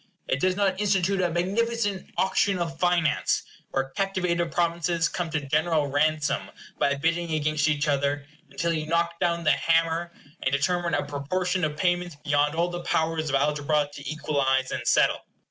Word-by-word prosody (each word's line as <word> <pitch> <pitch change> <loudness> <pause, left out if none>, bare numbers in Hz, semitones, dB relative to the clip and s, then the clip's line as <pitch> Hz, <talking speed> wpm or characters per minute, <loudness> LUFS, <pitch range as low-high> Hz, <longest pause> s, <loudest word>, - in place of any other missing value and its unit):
It 130 - 0
does 185 +3 +2
not 195 -1 +1
institute 195 -1 +2
a 180 - +2
magnificent 205 +3 -1
auction 190 +1 +2
of 165 -2 -4
finance, 175 -3 +2 0.3
where 135 0 -1
captivated 180 -2 -1
provinces 170 -1 +1
come 175 0 -3
to 160 -1 -1
general 155 +1 +2
ransom 150 +2 0 0.3
by 140 - +2
bidding 165 +4 0
against 155 0 +1
each 150 0 0
other, 140 0 0 0.2
until 170 0 -1
you 155 -1 -3
knock 170 +1 0
down 170 0 0
the 155 - +4
hammer, 165 +1 +1 0.3
and 130 - 0
determine 170 +4 +1
a - - -1
proportion 180 +6 -2
of 150 -1 -1
payments 175 -1 0
beyond 145 +1 +1
all 170 +1 +1
the 175 0 -5
powers 160 -2 0
of 140 - +1
algebra 145 +1 +1
to 140 -1 -7
equalize 135 -4 0
and - - -4
settle. - - +3
165 Hz, 165 wpm, -26 LUFS, 150-175 Hz, 0.3 s, the